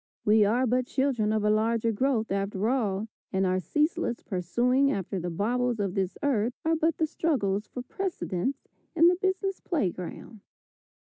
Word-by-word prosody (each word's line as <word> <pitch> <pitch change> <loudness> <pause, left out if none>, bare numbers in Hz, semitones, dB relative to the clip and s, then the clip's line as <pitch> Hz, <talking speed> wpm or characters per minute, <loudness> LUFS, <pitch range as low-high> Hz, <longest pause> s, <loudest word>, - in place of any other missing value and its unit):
"We 210 0 +5
are 240 +5 +2
but 250 +1 +1
children 260 -7 +1
of 215 -1 0
a 210 - +3
larger 225 +1 +1
growth" 225 -1 0
after 195 +1 -1
all, 220 -5 0 0.2
and 190 0 +1
our 185 0 +1
ceaseless 300 - -1
pursuing 245 +9 +1
after 195 -4 -3
the 175 +1 -3
baubles 235 +6 0
of 195 -3 -1
this 190 -2 -2
earth 240 -4 +1
are 325 0 +3
but 320 0 +1
the 320 - +2
struggles 220 -11 -1
for 250 - -7
precedence 275 - -3 0.3
in 335 0 +5
the 360 - +3
business 380 +1 -1
play 290 - 0
ground. 190 +5 -9
230 Hz, 170 wpm, -28 LUFS, 200-275 Hz, 0.3 s, We